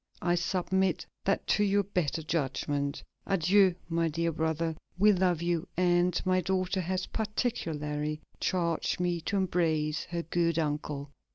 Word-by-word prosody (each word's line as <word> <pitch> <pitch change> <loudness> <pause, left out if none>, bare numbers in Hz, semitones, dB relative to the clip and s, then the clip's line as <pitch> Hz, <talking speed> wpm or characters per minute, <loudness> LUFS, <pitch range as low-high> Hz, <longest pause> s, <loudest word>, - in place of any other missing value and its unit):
I 175 - +3
submit 185 +1 0 0.2
that 195 - +1
to 210 - +2
your 200 0 +3
better 175 -5 -1
judgment.... 145 -2 -1 0.2
Adieu, 190 0 +4
my 165 0 +1
dear 165 +2 0
brother; 160 +1 -1 0.2
we 210 +3 +6
love 180 -3 +1
you, 170 0 0
and 175 0 +3
my 185 0 +3
daughter 185 +1 0
has 185 +1 -2
particularly 155 - -2 0.2
charged 170 -3 0
me 175 -1 0
to 200 +5 -1
embrace 160 -5 +1
her 170 -1 -3
good 170 0 0
uncle." 150 -2 -2
170 Hz, 140 wpm, -30 LUFS, 160-185 Hz, 0.2 s, we